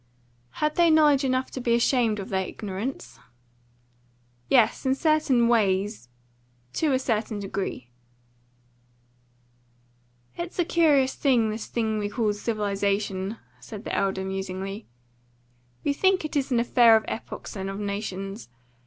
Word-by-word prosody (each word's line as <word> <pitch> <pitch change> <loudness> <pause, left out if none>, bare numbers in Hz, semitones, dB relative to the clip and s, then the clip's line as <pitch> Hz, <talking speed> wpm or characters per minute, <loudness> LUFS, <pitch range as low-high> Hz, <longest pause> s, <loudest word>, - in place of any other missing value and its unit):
"Had 300 0 -1
they 340 -1 +5
knowledge 300 -3 +5
enough 260 0 0
to 260 - -5
be 235 -1 +2
ashamed 235 -2 +2
of 195 - -6
their 190 -2 -1
ignorance?" 210 +6 -6 1.3
"Yes, 240 -5 +3
in 265 -1 +2
certain 300 -6 +2
ways 200 - +1 0.6
to 310 -3 +1
a 260 - +3
certain 225 -4 -1
degree." 190 -11 -5 2.4
"It's 345 0 -6
a 350 - +2
curious 295 -6 +3
thing, 240 -6 +2
this 215 +1 -5
thing 220 -2 -1
we 205 0 -2
call 215 -1 0
civilisation," 205 -1 -2 0.2
said 215 -2 -9
the - - -5
elder 190 -1 0
musingly. 195 +2 -5 1.0
"We 285 - +1
think 380 +2 +2
it 310 - -5
is 275 -1 0
an 240 - +3
affair 235 -1 +5
of 220 - +1
epochs 225 - -6
and 195 -1 -4
of 195 +1 -5
nations. 200 - -5
220 Hz, 135 wpm, -25 LUFS, 200-265 Hz, 2.4 s, they